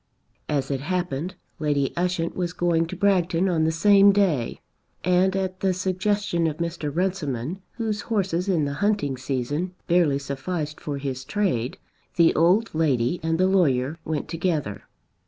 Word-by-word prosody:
As 145 -2 -1
it 135 - -1
happened, 175 +1 -2 0.2
Lady 145 -3 0
Ushant 175 -1 -1
was 175 -1 -2
going 170 -2 +1
to - - -6
Bragton 185 -2 +2
on 165 -4 +2
the 160 - +2
same 200 +4 +6
day, 180 - +1 0.4
and 180 +2 +3
at 190 -1 -2
the 190 -1 +1
suggestion 185 -1 0
of 155 -1 -3
Mr. 170 -3 -3
Runciman, 170 -3 -2
whose 220 -3 -2
horses 190 -4 0
in 165 -6 +2
the 140 - -2
hunting 205 -10 +1
season 140 +7 -3
barely 170 -5 +3
sufficed 150 +3 -4
for 145 -2 -4
his 135 -2 -4
trade, 130 - -1 0.4
the 170 -1 +5
old 185 +8 +3
lady 145 -2 +1
and 160 +1 0
the 185 - +3
lawyer 160 -6 +2
went 155 -2 -3
together. 155 - -2
170 Hz, 155 wpm, -24 LUFS, 145-185 Hz, 0.4 s, same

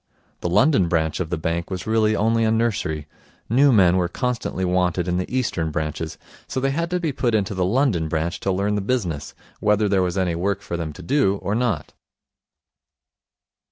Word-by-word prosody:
The 85 - -2
London 100 - +4
branch 80 -2 0
of 90 -3 -2
the 90 - -1
bank 85 +2 -2
was 95 -2 -4
really 110 -1 +2
only 115 +2 +2
a 110 - +3
nursery. 110 -9 0 0.4
New 135 +5 +5
men 95 -6 +5
were 90 -1 +1
constantly 120 -2 -2
wanted 90 -1 +1
in 90 0 0
the 90 - -3
Eastern 110 -11 -1
branches, 80 0 -3 0.3
so - - -2
they 135 +1 +1
had 170 +4 -1
to 180 0 0
be 165 -4 -1
put 120 -3 0
into 105 -1 0
the 95 -1 0
London 105 - +1
branch 80 +2 -2
to 95 - -1
learn 100 +2 0
the 105 - 0
business, 95 - -2 0.2
whether 105 0 +2
there 100 -1 +2
was 90 0 -1
any 90 -2 +1
work 95 +4 -1
for 85 - -4
them 85 -2 -3
to 90 - -11
do 100 - +2
or 100 - -1
not. 115 -9 -1
95 Hz, 195 wpm, -22 LUFS, 85-115 Hz, 0.4 s, New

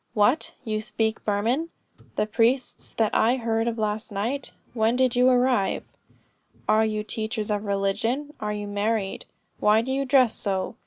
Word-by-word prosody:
'What, 235 +8 +2
you 215 -3 -2
speak 220 0 -2
Burman? 230 +10 0 0.5
the 210 - +1
priests 235 +4 0
that 220 -2 +1
I 235 +3 +4
heard 225 -2 0
of 235 0 -1
last 215 0 -2
night? 235 +8 -2 0.2
When 225 0 +2
did 255 -1 +2
you 250 +1 +5
arrive? 250 -5 +2 0.8
Are 215 +1 +4
you 215 -1 -2
teachers 220 0 -3
of 210 0 -1
religion? 205 +8 -1
Are 210 0 -2
you 210 0 -4
married? 205 0 -1 0.3
Why 215 +2 +4
do 260 - -3
you 275 +1 0
dress 255 -4 +4
so?' 190 -2 -2
220 Hz, 160 wpm, -25 LUFS, 210-245 Hz, 0.8 s, you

